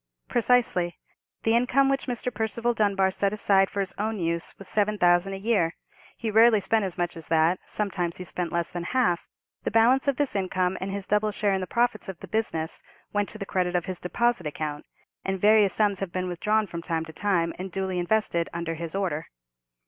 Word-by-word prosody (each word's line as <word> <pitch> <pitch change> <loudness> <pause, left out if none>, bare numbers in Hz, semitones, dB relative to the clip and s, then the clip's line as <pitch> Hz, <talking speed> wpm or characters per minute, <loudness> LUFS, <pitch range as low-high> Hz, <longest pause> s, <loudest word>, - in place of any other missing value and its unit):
"Precisely. 230 -8 +2 0.5
The 225 +1 +3
income 250 +3 +3
which 275 0 0
Mr. 245 0 -2
Percival 230 +2 -1
Dunbar 200 -3 +2
set 200 +1 0
aside 195 -2 +3
for 200 - -2
his 190 0 -3
own 215 +1 -1
use 170 -2 -1
was 195 - -10
seven 210 +1 +1
thousand 175 +1 +3
a - - -3
year. 195 -5 +1 0.4
He 225 -2 -3
rarely 225 0 +6
spent 220 +2 +2
as 185 -3 -3
much 175 +1 -1
as 165 - -7
that; 165 +2 +3
sometimes 180 -5 -1
he 185 - -6
spent 180 -1 -2
less 170 -1 -1
than 175 - -4 0.2
half. 175 -9 +1 0.3
The - - -2
balance 240 +5 +4
of 280 - +3
this 285 -5 -1
income, 185 -1 0
and 190 - -3
his 195 0 -4
double 210 +1 +1
share 205 0 0
in 190 - 0
the 185 - -4
profits 235 -3 0
of 190 - -6
the - - -9
business, 165 -7 -2 0.3
went 205 -1 0
to - - -7
the 200 - -5
credit 180 -2 -1
of 175 - +1
his 185 -2 -5
deposit 235 -1 0
account, 150 0 -5 0.4
and 190 0 -2
various 210 -1 +5
sums 205 -3 +2
have 195 -3 -4
been 185 0 -2
withdrawn 210 +5 +1
from 170 -4 -6
time 165 -1 -2
to 160 - -11
time, 170 -3 0
and 185 0 -5
duly 190 0 -2
invested 175 -2 0
under 170 -1 -3
his 165 +1 -5
order." 175 -6 -2
195 Hz, 210 wpm, -26 LUFS, 175-215 Hz, 0.5 s, rarely